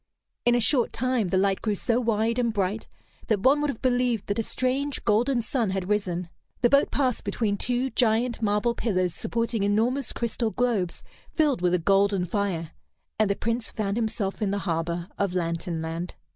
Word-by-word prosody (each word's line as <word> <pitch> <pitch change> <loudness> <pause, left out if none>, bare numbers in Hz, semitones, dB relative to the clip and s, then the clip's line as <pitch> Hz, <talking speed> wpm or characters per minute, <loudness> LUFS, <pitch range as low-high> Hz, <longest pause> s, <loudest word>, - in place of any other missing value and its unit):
In 240 0 +5
a - - +3
short 240 +2 +3
time 250 -6 0
the 185 - +1
light 195 0 +1
grew 215 -2 0
so 230 +4 0
wide 230 0 +1
and 235 -2 +1
bright 205 +1 -2 0.4
that 210 -3 +1
one 275 +6 +4
would 295 - 0
have 255 - -5
believed 245 -4 +1
that 205 +2 -2
a - - +3
strange, 260 +4 -2
golden 235 +3 +2
sun 230 -3 -1
had 190 0 -3
risen. 180 -4 -1 0.3
The 240 - +4
boat 280 0 +4
passed 260 -4 0
between 205 0 -1
two 250 +5 -1
giant 235 0 +1
marble 210 +2 +1
pillars 185 -7 0
supporting 230 -1 -2
enormous 225 +6 +1
crystal 235 0 -1
globes 220 -7 -1 0.3
filled 295 - +1
with 180 0 +3
a - - +3
golden 195 +1 +2
fire, 180 -4 -2 0.5
and 215 -2 +3
the 200 - +1
Prince 230 +2 -2
found 200 -2 -2
himself 220 -3 -2
in 205 - +1
the 200 - 0
harbor 170 0 -2
of 195 -2 0
Lantern 170 -1 -2
Land. 165 +2 -5
215 Hz, 185 wpm, -26 LUFS, 195-240 Hz, 0.5 s, In